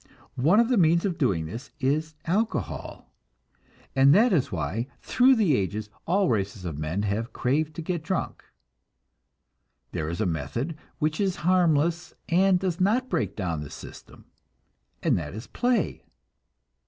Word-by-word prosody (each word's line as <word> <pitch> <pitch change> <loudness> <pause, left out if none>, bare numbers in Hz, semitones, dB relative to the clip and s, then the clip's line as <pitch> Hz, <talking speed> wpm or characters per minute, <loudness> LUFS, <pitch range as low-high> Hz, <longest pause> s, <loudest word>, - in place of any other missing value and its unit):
One 170 - +5
of 235 0 +3
the 250 - +3
means 170 +1 +4
of 185 -4 -2
doing 95 - +1
this 115 +11 -7
is 155 +4 0
alcohol, 210 +7 -2 0.8
and 135 +2 +6
that 225 +3 +5
is 140 -9 +1
why 95 - -2 0.2
through 260 +1 +4
the 195 - +3
ages 105 +1 -2 0.2
all 190 +3 +3
races 100 - -1
of 80 -4 -4
men 80 +6 -2
have 105 +3 -2
craved 150 +4 0
to 165 - -5
get 175 0 -2
drunk. 170 +3 -3 1.5
There 80 -3 -3
is 85 - -4
a 110 - +1
method 115 - -2 0.2
which 155 +3 0
is 190 -3 +1
harmless, 170 -1 +2
and 185 +2 +4
does 185 -1 -2
not 240 +7 +2
break 170 - -1
down 85 -6 -2
the 75 - -7
system, - - -12 0.8
and - - +2
that 80 +3 -6
is 110 +3 -7
play. 245 0 0
155 Hz, 155 wpm, -26 LUFS, -, 1.5 s, and